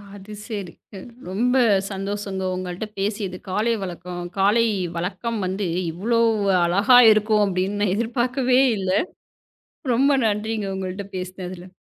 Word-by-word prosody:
அது 205 +1 -11
செரி. 200 -6 -5 0.6
ரொம்ப 240 +7 +1 0.4
சந்தோஷம்ங்க, 195 0 -4
உங்கள்ட்ட 185 +3 -5
பேசியது. 200 -2 -2
காலை 215 +5 +1
வழக்கம் 175 -1 -6 0.2
காலை 210 +4 +4 0.3
வழக்கம் 195 +6 -3
வந்து 190 +1 -2 0.2
இவ்வளோ 225 +8 0 0.4
அழகா 205 +8 +5
இருக்கும் 215 0 +3
அப்படின்னு 190 +2 -1
நான் 200 -3 +2
எதிர்பாக்கவே 250 +3 +1 0.2
இல்ல. 190 -1 -2 1.0
ரொம்ப 275 +4 +3 0.2
நன்றிங்க, 215 0 -1
உங்கள்ட்ட 190 +1 -5
பேசினதுல. 185 0 -7
200 Hz, 110 wpm, -22 LUFS, 185-220 Hz, 1.0 s, அழகா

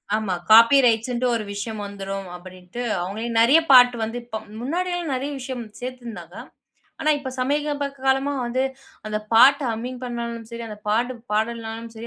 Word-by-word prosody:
ஆமா 215 -4 -1 0.2
காப்பி 230 +5 +8
ரைட்ஸ்ன்னுட்டு 240 +2 +1
ஒரு 220 - -2
விஷயம் 210 +1 -5
வந்துரும். 195 -1 -6
அப்படின்னுட்டு, 185 +5 -9 0.2
அவங்களே 210 +6 -4
நிறைய 275 +8 +6
பாட்டு 245 -1 +8
வந்து 225 +2 -3
இப்ப 220 -2 -6 0.2
முன்னாடிலாம் 345 +2 -2
நிறைய 275 +3 -3
விஷயம் 255 -2 -5 0.2
சேர்த்துருந்தாங்க. 245 -3 -8 0.7
ஆனா 310 -1 +2
இப்ப 275 -2 -6
சமீப 290 +2 0 0.2
காலமா 270 +2 +2
வந்து 255 +2 0 0.4
அந்த 215 0 -2
பாட்ட 270 +5 +7
ஹம்மிங் 245 +3 -5
பண்ணாலும் 235 -2 -5
சரி, 235 0 -6
அந்த 210 -1 -8
பாட்டு 240 +4 +1 0.2
பாடலனாலும் 225 +1 -2
சரி, 225 +1 -8
235 Hz, 150 wpm, -23 LUFS, 220-260 Hz, 0.7 s, காப்பி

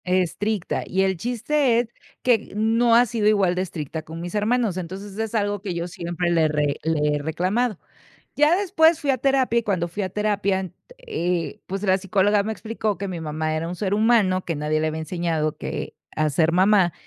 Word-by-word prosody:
Estricta, 185 +2 0
y 190 +1 +1
el 190 0 +1
chiste 245 - +1
es 240 -1 -2 0.3
que 235 -4 +2
no 230 +2 +3
ha 240 +1 +6
sido 225 -2 0
igual 200 -4 +3
de 180 - -1
estricta 160 -4 -5
con 160 +1 -9
mis 175 +1 -6
hermanos, 215 -2 +1
entonces, 190 +3 -6
es 225 0 -2
algo 205 -2 0
que 190 -4 -4
yo 170 0 -2
siempre 175 0 -3
le 165 -1 +3
he - - +4
re 150 -2 0
le 150 -2 +1
he - - -4
reclamado. 185 +8 -1 0.6
Ya 300 +4 +5
después 335 -5 +3
fui 290 -3 0
a 260 - +1
terapia, 265 -2 +2
y - - 0
cuando 180 -5 0
fui 200 +4 -3
a - - -2
terapia, 200 -1 0
ent 185 -2 -7 0.2
eh, 180 - -2
pues, 195 +1 -4
la 190 -2 +3
psicóloga 200 +1 +2
me 220 - -2
explicó 220 -2 -3
que 200 +3 -4
mi 175 -3 -5
mamá 155 0 -2
era 160 +1 -2
un 175 - -4
ser 190 +1 -2
humano, 210 -4 +3
que 165 - -2
nadie 150 +1 -1
le 155 - 0
había 155 0 -2
enseñado 160 -2 -1
que - - -5 0.2
a 155 0 +1
ser 160 +3 +2
mamá, 190 -1 +4
190 Hz, 210 wpm, -23 LUFS, 170-220 Hz, 0.6 s, ha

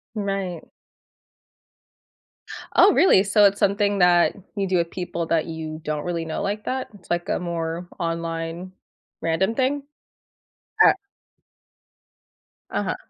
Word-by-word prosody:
Right. 195 -4 -3 2.1
Oh, 395 0 +7
really? 275 - +5
So, 205 +1 +4
it's 200 0 +3
something 200 0 +2
that 175 -1 +4 0.2
you 195 -1 -1
do 185 -1 +1
with 170 0 -1
people 175 -2 -4
that 165 -2 +1
you 160 -1 -6
don't 150 -1 -3
really 170 -2 -2
know 160 - -3
like 205 +2 -3
that? 260 0 -2
It's 185 - -18
like 175 0 -1
a - - 0
more 170 0 -4
online 165 +2 -4 0.5
random 190 +7 0
thing? 275 +2 0 1.0
Uh - - +8 1.8
Uh-huh. - - -1
180 Hz, 125 wpm, -23 LUFS, 165-200 Hz, 2.1 s, Uh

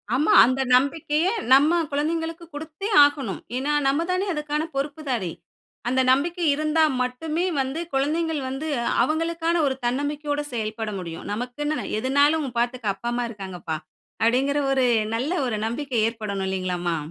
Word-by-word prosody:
ஆமா! 300 +4 +3
அந்த 260 +2 0
நம்பிக்கையை 300 +5 +1 0.2
நம்ம 295 +6 +5
குழந்தைங்களுக்கு 325 +3 -2
குடுத்தே 315 +7 -5
ஆகணும். 280 -8 0 0.2
ஏன்னா, 275 +3 -1 0.2
நம்ம 280 +4 +2
தானே 370 +2 0
அதுக்கான 300 0 -2
பொறுப்புதாரி. 275 - -2 0.6
அந்த 260 +1 +2
நம்பிக்கை 340 +6 +1
இருந்தா 310 +2 +2 0.2
மட்டுமே 305 +7 -1 0.2
வந்து 270 +4 -3
குழந்தைங்கள் 305 +3 0
வந்து 270 +4 -4 0.4
அவங்களுக்கான 330 +1 0
ஒரு 270 -2 0
தன்னம்பிக்கையோட 290 +3 -1
செயல்பட 220 -1 -3
முடியும். 165 -2 -7
"நமக்குன்னு 250 +7 -3
எதுனாலும் 285 +4 +2
பாத்துக்க 240 -3 0
அப்பா, 235 +5 -5
அம்மா 245 0 -1
இருக்காங்கப்பா!" 185 -6 -5 0.5
அப்படீங்கிற 265 +5 +2
ஒரு 265 -1 +3 0.3
நல்ல 260 +8 -1 0.2
ஒரு 230 - -1
நம்பிக்கை 260 +2 -3
ஏற்படணும் 210 -4 -3
இல்லைங்களாம்மா? 180 -3 -1
275 Hz, 130 wpm, -24 LUFS, 240-310 Hz, 0.6 s, நம்ம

